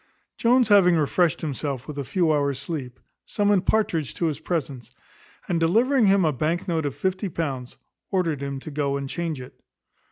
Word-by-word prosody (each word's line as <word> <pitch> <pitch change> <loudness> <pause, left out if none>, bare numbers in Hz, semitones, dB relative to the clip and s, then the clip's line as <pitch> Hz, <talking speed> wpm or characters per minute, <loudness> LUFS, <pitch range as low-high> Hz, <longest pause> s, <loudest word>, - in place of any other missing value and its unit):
Jones 245 0 +3
having 190 -4 +6
refreshed 160 +2 +1
himself 140 -3 -4
with 145 -1 -6
a - - -2
few 170 +3 +1
hours' 140 -2 0
sleep, 140 -4 -6 0.2
summoned 205 -3 +1
Partridge 170 -10 +1
to 170 - -1
his 155 -3 -1
presence; 140 -8 -4 0.6
and 170 -2 0
delivering 225 +8 +3
him 195 -2 +4
a 155 - +2
bank 160 +6 -1
note 160 -4 0
of 140 - -5
fifty 190 +1 -2
pounds, 135 -7 -4 0.3
ordered 170 -7 0
him 140 -1 -4
to 155 - -8
go 140 -1 -1
and 140 -1 -4
change 165 -1 -3
it. 125 - -11
160 Hz, 180 wpm, -24 LUFS, 140-185 Hz, 0.6 s, having